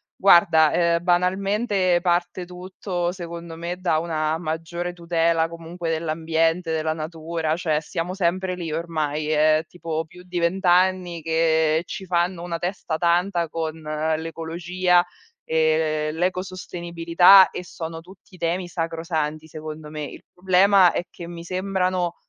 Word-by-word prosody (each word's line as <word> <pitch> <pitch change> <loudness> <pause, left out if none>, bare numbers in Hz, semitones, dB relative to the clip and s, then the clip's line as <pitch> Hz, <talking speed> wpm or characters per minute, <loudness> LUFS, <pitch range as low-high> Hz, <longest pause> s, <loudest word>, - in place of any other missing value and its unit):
Guarda, 160 -5 +5
ehm, 170 0 +2
banalmente, 185 +1 +1
parte 175 0 0
tutto, 180 0 -4
secondo 170 -2 -8
me, 170 +1 -4
da 170 -3 +2
una 160 -1 -1
maggiore 170 +2 -4
tutela 165 -1 +1
comunque 170 0 -6
dell'ambiente, 165 +1 0
della 155 0 0
natura, 160 0 -3
cioè 155 -3 0
siamo 170 +3 -4
sempre 185 0 -1
lì 170 -3 -5
ormai. 155 -2 -2
È 155 +1 +3
tipo 165 -2 -4
più 180 +3 -15
di 180 -1 -4
20 175 +3 0
anni 180 -1 +2
che 160 0 +2
ci 190 - -7
fanno 175 0 0
una 170 -1 -3
testa 175 -3 -3
tanta 175 0 +1
con 160 -1 -3
l'ecologia 165 +3 0 0.4
e 155 -1 +1
l'ecosostenibilità 180 +1 +3
e 180 - -6
sono 165 -2 -7
tutti 185 +1 -17
temi 175 +2 -1
sacrosanti, 165 -2 -3
secondo 155 0 -8
me. 150 0 -5
Il - - -10
problema 185 0 +5
è - - -2
che 170 - -10
mi 170 0 -8
sembrano, 185 -1 -1
170 Hz, 130 wpm, -23 LUFS, 160-180 Hz, 0.4 s, Guarda